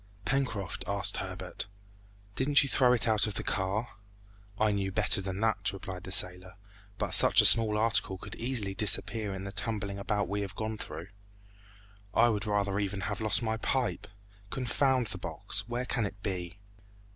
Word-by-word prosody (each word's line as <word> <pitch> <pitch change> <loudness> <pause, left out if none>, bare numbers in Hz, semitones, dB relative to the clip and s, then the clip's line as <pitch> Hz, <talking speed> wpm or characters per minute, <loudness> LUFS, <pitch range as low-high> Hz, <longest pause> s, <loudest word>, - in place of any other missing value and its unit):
"Pencroft," 125 -9 -2
asked - - +1
Herbert, - - -6 0.7
"didn't 140 +2 +3
you 140 - -3
throw 125 -2 +4
it 125 0 +2
out 110 0 +4
of 105 - -4
the - - -3
car?" 100 +2 -2 0.6
"I 110 -1 +3
knew 100 -1 -2
better 105 0 +2
than 95 +1 -5
that," 110 -1 +1
replied 95 -2 -8
the 95 - -7
sailor; 90 0 +2 0.4
"but - - -3
such - - +5
a - - +7
small 110 -2 +7
article 105 -3 +1
could 100 +2 -9
easily 115 -5 -2
disappear 105 +2 +3
in 95 0 -6
the 100 - -6
tumbling 100 -2 -4
about 100 +1 -1
we 100 +1 -3
have 100 0 -6
gone 110 0 -4
through. 80 +2 -7 1.1
I 120 +1 +5
would 105 -1 -2
rather 100 -1 0
even 100 -1 -3
have 100 +3 -4
lost 110 +2 +1
my 110 -1 -1
pipe! 125 +2 -2 0.4
Confound 130 +1 0
the 105 - -7
box! 100 +4 -2
Where 120 +1 -3
can 120 -4 -1
it 100 +1 -12
be?" 90 -2 -4
105 Hz, 175 wpm, -29 LUFS, 95-115 Hz, 1.1 s, a